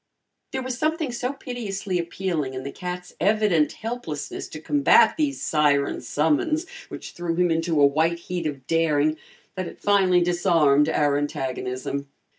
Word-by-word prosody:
There 265 -1 -3
was 255 -1 -4
something 315 -2 0
so 245 +2 -2
piteously 205 -8 -4
appealing 170 -6 -2
in 130 - -5
the 140 - -5
cat's 180 +1 -6
evident 200 -5 +2
helplessness 220 -11 -5
to 155 - -8
combat 245 - +4
these 295 -3 -1
siren 145 -2 +2
summons, 160 - 0 0.2
which - - -8
threw 175 -1 -3
him 175 0 +2
into 165 -1 +1
a 145 - +7
white 160 +4 +2
heat 170 -1 -4
of 135 -3 -6
daring, 155 -2 +2 0.4
that 185 -2 -4
it - - -10
finally 190 -3 +3
disarmed 165 -5 +3
our 145 -2 +2
antagonism. 135 0 -3
170 Hz, 150 wpm, -24 LUFS, 150-205 Hz, 0.4 s, a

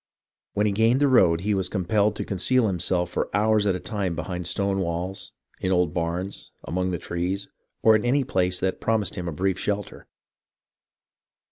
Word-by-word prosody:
When 105 - +1
he 105 - +2
gained 115 +5 +3
the 145 - +4
road, 90 -11 +4
he 105 +2 0
was 95 -2 -1
compelled 105 +2 +1
to - - -4
conceal 115 +6 +2
himself 90 -2 0
for - - -1
hours 105 0 +3
at 95 - +2
a - - -3
time 95 -4 -2
behind 90 +1 -3
stone 100 +1 0
walls, 90 +2 -3 0.3
in 95 - -1
old 90 -4 +2
barns, 85 +3 -3
among 90 +2 -1
the 90 - -1
trees, 90 +4 -3 0.4
or 110 -1 +7
in 105 - +1
any 135 +3 +2
place 90 -5 0
that 95 0 -1
promised 110 -3 0
him 90 -2 -5
a - - -2
brief 95 +3 -1
shelter. 105 -1 -3
95 Hz, 180 wpm, -25 LUFS, 90-105 Hz, 0.4 s, or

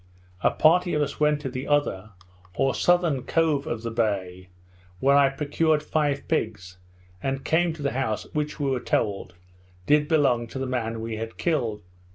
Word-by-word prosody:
A - - +4
party 175 +2 +3
of 150 - +1
us 145 - -5
went 150 -1 +2
to 135 - -4
the 130 +1 -5
other, 110 -9 0 0.4
or 135 +5 +1
southern 175 -6 +2
cove 155 -1 +1
of 115 -1 -4
the 115 - -3
bay, 95 -5 -2 0.5
where 140 +5 +4
I 140 -1 +5
procured 150 +2 0
five 145 -3 -1
pigs, 105 - -3 0.4
and 135 0 -3
came 170 +1 +2
to 155 -2 -8
the 140 - 0
house 110 -5 -2
which, 150 0 -2
we 140 -2 0
were 130 - 0
told, 100 -6 -2 0.5
did 150 +4 +3
belong 135 -7 +2
to 125 - -8
the 135 - -2
man 115 -3 -3
we 115 -1 -4
had 115 0 -6
killed. 120 -11 -1
135 Hz, 180 wpm, -25 LUFS, 115-150 Hz, 0.5 s, I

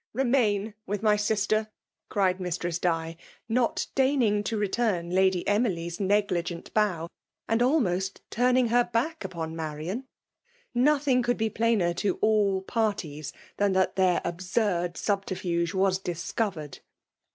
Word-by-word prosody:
Refnain 225 -5 +1
with 205 +2 -3
my 210 -1 +5
sister!'* 215 +1 +1 0.4
cried 190 -2 +1
Mistress 175 -1 -2
Di, 165 -2 -1 0.3
not 235 +1 +1
deigning 260 -7 +2
to 225 - -1
return 205 -4 0
Lady 185 -1 +2
Emily 205 -5 +1
s 170 0 -6
negligent 185 -4 0
bow, 185 -6 +1 0.4
and 225 +1 +1
almost 195 - +1
turning 250 0 +3
bet 240 +1 +2
back 260 +7 -1
upon 165 -4 -5
Marian; 160 - -4 0.7
nothing 270 0 +3
could 245 0 0
be 220 -1 0
plainer 220 -6 +2
to 195 +2 0
all 205 -3 +2
parties 190 - -2 0.3
than 205 -1 +2
that 190 0 +1
their 185 -2 +3
absurd 175 0 -1
subterfuge 185 -4 -1
was 190 0 +2
discoyered 175 - -3
200 Hz, 130 wpm, -27 LUFS, 175-225 Hz, 0.7 s, my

